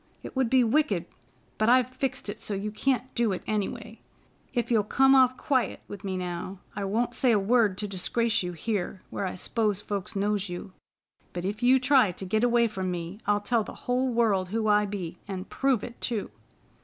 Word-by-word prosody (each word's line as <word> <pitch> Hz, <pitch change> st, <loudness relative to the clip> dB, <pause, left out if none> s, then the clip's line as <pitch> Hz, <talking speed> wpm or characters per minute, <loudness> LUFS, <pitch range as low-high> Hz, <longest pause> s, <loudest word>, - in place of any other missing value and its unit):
It -, -, -8 dB
would 260 Hz, -3 st, +1 dB
be 260 Hz, 0 st, +5 dB
wicked. 220 Hz, -, +1 dB, 0.5 s
But 215 Hz, +1 st, +3 dB
I've 255 Hz, 0 st, +4 dB
fixed 260 Hz, -2 st, -3 dB
it 205 Hz, +2 st, -6 dB
so 210 Hz, -, -1 dB
you 205 Hz, +2 st, -3 dB
can't 255 Hz, +3 st, -1 dB
do 235 Hz, -3 st, +1 dB
it, 185 Hz, -, -5 dB
any 210 Hz, -2 st, 0 dB
way. -, -, -10 dB, 0.5 s
If 240 Hz, 0 st, -1 dB
you'll 220 Hz, -3 st, +4 dB
come 270 Hz, +6 st, +4 dB
off 255 Hz, -1 st, +5 dB
quiet 255 Hz, -7 st, 0 dB
with 205 Hz, 0 st, -9 dB
me 190 Hz, -2 st, -2 dB
now, 180 Hz, +1 st, -4 dB, 0.2 s
I 200 Hz, -1 st, -2 dB
won't 225 Hz, +5 st, 0 dB
say 255 Hz, -, +2 dB
a 220 Hz, -, +4 dB
word 210 Hz, -1 st, +2 dB
to 210 Hz, -, -2 dB
disgrace 230 Hz, +4 st, +1 dB
you 180 Hz, -1 st, -4 dB
here 190 Hz, 0 st, -3 dB
where 195 Hz, -, -2 dB
I -, -, -5 dB
s'pose 210 Hz, +1 st, 0 dB
folks 205 Hz, -2 st, -4 dB
knows 205 Hz, 0 st, 0 dB
you; 175 Hz, +2 st, -7 dB, 0.6 s
but 175 Hz, 0 st, -4 dB
if 205 Hz, +4 st, -3 dB
you 255 Hz, +2 st, +5 dB
try 260 Hz, -6 st, +4 dB
to 190 Hz, -, -7 dB
git 215 Hz, +5 st, 0 dB
away 240 Hz, -1 st, +4 dB
from 190 Hz, -4 st, -3 dB
me, 175 Hz, +2 st, -5 dB
I'll 205 Hz, 0 st, +2 dB
tell 230 Hz, +1 st, +1 dB
the -, -, -9 dB
whole 250 Hz, +1 st, +1 dB
world 210 Hz, -6 st, +2 dB
who 220 Hz, +2 st, -1 dB
I 210 Hz, 0 st, +4 dB
be, 180 Hz, -4 st, -5 dB
an' 190 Hz, -1 st, -5 dB
prove 265 Hz, -3 st, 0 dB
it 235 Hz, -, -9 dB
too!" 220 Hz, -, -2 dB
210 Hz, 210 wpm, -27 LUFS, 195-240 Hz, 0.6 s, be